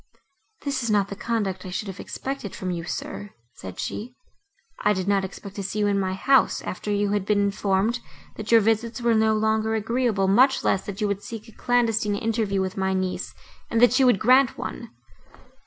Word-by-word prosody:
"This 280 Hz, -2 st, -1 dB
is 235 Hz, -, -2 dB
not 205 Hz, -2 st, +2 dB
the 200 Hz, -, -5 dB
conduct 200 Hz, -4 st, -2 dB
I 185 Hz, -, -7 dB
should 210 Hz, +4 st, -4 dB
have 190 Hz, 0 st, -7 dB
expected 270 Hz, -7 st, -5 dB
from 185 Hz, -1 st, -3 dB
you, 170 Hz, -1 st, -4 dB
sir;" 205 Hz, +3 st, -6 dB, 0.2 s
said 95 Hz, -5 st, -9 dB
she, 245 Hz, +4 st, -5 dB, 0.6 s
"I 210 Hz, -, +3 dB
did 190 Hz, -1 st, -3 dB
not 200 Hz, -1 st, +2 dB
expect 195 Hz, +1 st, -8 dB
to 200 Hz, -, -3 dB
see 195 Hz, +2 st, -4 dB
you 210 Hz, -, +2 dB
in 200 Hz, -1 st, +2 dB
my 190 Hz, -1 st, -1 dB
house, 270 Hz, +7 st, +3 dB
after 185 Hz, -, -5 dB
you 205 Hz, 0 st, +1 dB
had 205 Hz, -2 st, 0 dB
been 205 Hz, +1 st, +1 dB
informed, 200 Hz, +3 st, +1 dB, 0.4 s
that 215 Hz, +1 st, -6 dB
your 230 Hz, -1 st, +7 dB
visits 225 Hz, +3 st, 0 dB
were 235 Hz, -1 st, +2 dB
no 220 Hz, 0 st, +3 dB
longer 220 Hz, +1 st, +1 dB
agreeable, 220 Hz, -2 st, 0 dB
much 255 Hz, +8 st, +4 dB
less, 190 Hz, -, +1 dB
that 200 Hz, 0 st, -6 dB
you 210 Hz, -, +2 dB
would 200 Hz, 0 st, -2 dB
seek 225 Hz, +1 st, -8 dB
a -, -, -13 dB
clandestine 225 Hz, -3 st, +1 dB
interview 215 Hz, -2 st, 0 dB
with 190 Hz, 0 st, -3 dB
my 190 Hz, 0 st, 0 dB
niece, 185 Hz, -1 st, -3 dB, 0.3 s
and 230 Hz, -, +1 dB
that 245 Hz, +1 st, +6 dB
she 265 Hz, -, +4 dB
would 245 Hz, -5 st, +5 dB
grant 255 Hz, +4 st, +4 dB
one." 235 Hz, -, -6 dB
210 Hz, 205 wpm, -24 LUFS, 195-230 Hz, 0.6 s, your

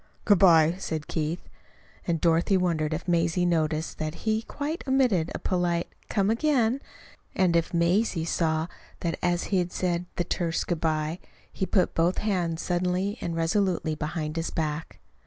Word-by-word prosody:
"Good 205 Hz, -4 st, +5 dB
bye," 165 Hz, -2 st, +6 dB
said 160 Hz, -5 st, -3 dB
Keith. 160 Hz, +2 st, -3 dB, 0.6 s
And 170 Hz, -2 st, +1 dB
Dorothy 170 Hz, +4 st, +3 dB
wondered 165 Hz, -4 st, 0 dB
if 160 Hz, +3 st, -4 dB
Mazie 170 Hz, 0 st, +2 dB
noticed 160 Hz, -2 st, 0 dB
that 155 Hz, +1 st, -3 dB
he 220 Hz, 0 st, +2 dB
quite 295 Hz, +7 st, -4 dB
omitted 245 Hz, -11 st, +2 dB
a -, -, 0 dB
polite 175 Hz, -2 st, -1 dB, 0.2 s
"Come 200 Hz, +1 st, +2 dB
again," 255 Hz, 0 st, +2 dB, 0.5 s
and 180 Hz, -3 st, +3 dB
if 165 Hz, -1 st, +1 dB
Mazie 170 Hz, 0 st, +1 dB
saw 160 Hz, -1 st, 0 dB, 0.4 s
that 170 Hz, -2 st, -2 dB
as 175 Hz, 0 st, +1 dB
he 185 Hz, -2 st, +4 dB
said 175 Hz, -1 st, -1 dB
the 175 Hz, -, 0 dB
terse 170 Hz, -2 st, -1 dB
"Good 170 Hz, -3 st, -3 dB
bye" 155 Hz, +1 st, 0 dB, 0.3 s
he 190 Hz, -, -2 dB
put 185 Hz, -4 st, +2 dB
both 170 Hz, +3 st, +2 dB
hands 175 Hz, -6 st, -1 dB
suddenly 180 Hz, +4 st, -1 dB
and 170 Hz, -, -3 dB
resolutely 165 Hz, -1 st, +1 dB
behind 155 Hz, 0 st, -3 dB
his 165 Hz, -, -1 dB
back. 155 Hz, 0 st, -3 dB
170 Hz, 155 wpm, -27 LUFS, 165-190 Hz, 0.6 s, bye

